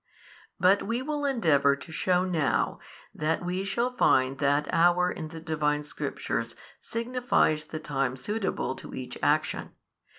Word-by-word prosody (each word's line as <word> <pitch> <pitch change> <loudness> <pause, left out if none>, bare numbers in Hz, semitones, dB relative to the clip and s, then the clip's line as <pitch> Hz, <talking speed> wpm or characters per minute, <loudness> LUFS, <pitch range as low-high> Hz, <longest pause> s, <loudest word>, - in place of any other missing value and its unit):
But 185 +3 +5
we 235 +4 -2
will 295 0 -2
endeavour 155 - +3
to 140 +3 -12
shew 180 +2 +1
now, 160 -9 0 0.3
that 160 +3 -1
we 180 +2 -1
shall 235 +5 -1
find 130 - +3
that 145 +1 +2
hour 175 +2 +4
in 160 - -5
the 160 +1 -9
Divine 150 -2 0
Scriptures 150 - -3 0.2
signifies 230 -10 0
the 155 - -6
time 135 -4 -1
suitable 200 - -2
to - - -9
each - - -7
action. - - 0
165 Hz, 140 wpm, -28 LUFS, 150-200 Hz, 0.3 s, But